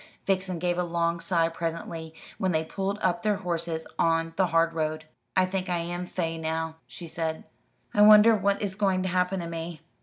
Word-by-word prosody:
Vixen 190 -2 0
gave 175 +1 0
a - - +2
long 170 0 0
sigh 165 -1 +2
presently, 165 -1 -5 0.2
when 190 - +1
they 160 -1 0
pulled 195 +4 -3
up 185 -2 +1
their 210 -1 +2
horses 170 -4 -3
on 165 0 +2
the 190 0 +3
hard 165 0 +2
road. 155 -1 -2 0.3
"I 185 - +4
think 185 0 -3
I 175 - +1
am 175 +1 -4
'fey' 165 -3 -3
now," 160 0 -3
she 170 - -8
said. 160 -1 -3 0.5
"I 205 - +3
wonder 215 +2 +8
what 200 0 0
is 200 -2 -2
going 190 -2 +1
to 185 - -1
happen 180 +1 +1
to 170 - -5
me?" 165 -1 -6
170 Hz, 195 wpm, -27 LUFS, 165-185 Hz, 0.5 s, wonder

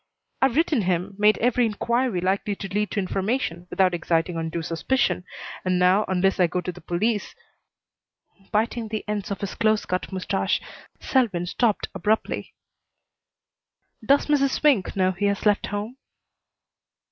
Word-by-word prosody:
I've 265 -2 +3
written 310 -5 +2
him, 185 +1 -1
made 210 +1 +5
every 245 +1 +2
inquiry 235 -1 0
likely 200 +3 0
to 195 - -6
lead 205 +2 -1
to - - -2
information 190 -2 -2
without 185 -2 +2
exciting 165 0 0
undue 165 0 -3
suspicion, 180 +4 0 0.4
and 185 -1 +1
now, 185 +4 +4
unless 190 +1 +1
I 180 - +5
go 180 +2 -2
to 180 - -3
the 180 - -13
police 205 +4 -1 0.6
" 195 -1 -34
Biting 225 +2 0
the 215 0 -4
ends 210 -1 -3
of 200 - -4
his 200 - -3
close 215 -1 +1
cut 185 +2 -3
mustache, 190 +1 0 0.4
Selwyn 210 -10 +1
stopped 215 +4 0
abruptly. 215 +1 -1 1.5
"Does 280 +6 +4
Mrs. 280 -2 +3
Swink 275 -11 +2
know 185 -1 +2
he 190 +3 -2
has 200 +1 0
left 205 -1 +3
home?" 210 +5 -4
200 Hz, 150 wpm, -24 LUFS, 180-225 Hz, 1.5 s, made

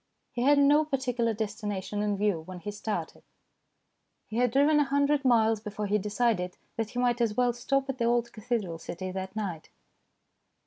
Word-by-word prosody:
He 240 - -3
had 285 +3 +5
no 290 +2 +5
particular 255 -5 0
destination 205 -2 -3
in 205 -1 0
view 200 -5 +1
when 185 +3 -9
he 205 - -4
started; 205 -5 -4 1.0
he 220 - -6
had 245 0 +3
driven 285 +5 +4
a - - +5
hundred 285 +1 +2
miles 225 -4 +4
before 210 -1 -5
he 210 +1 +1
decided 205 -3 0 0.2
that 225 -2 -2
he 245 - -9
might 245 -1 +1
as 220 -3 +1
well 245 -1 +3
stop 270 +3 0
at 270 -1 -4
the 235 - +1
old 235 0 +1
cathedral 215 -7 -3
city 185 +3 -6
that 190 +1 -5
night. 185 -7 -4
225 Hz, 180 wpm, -28 LUFS, 205-250 Hz, 1.0 s, had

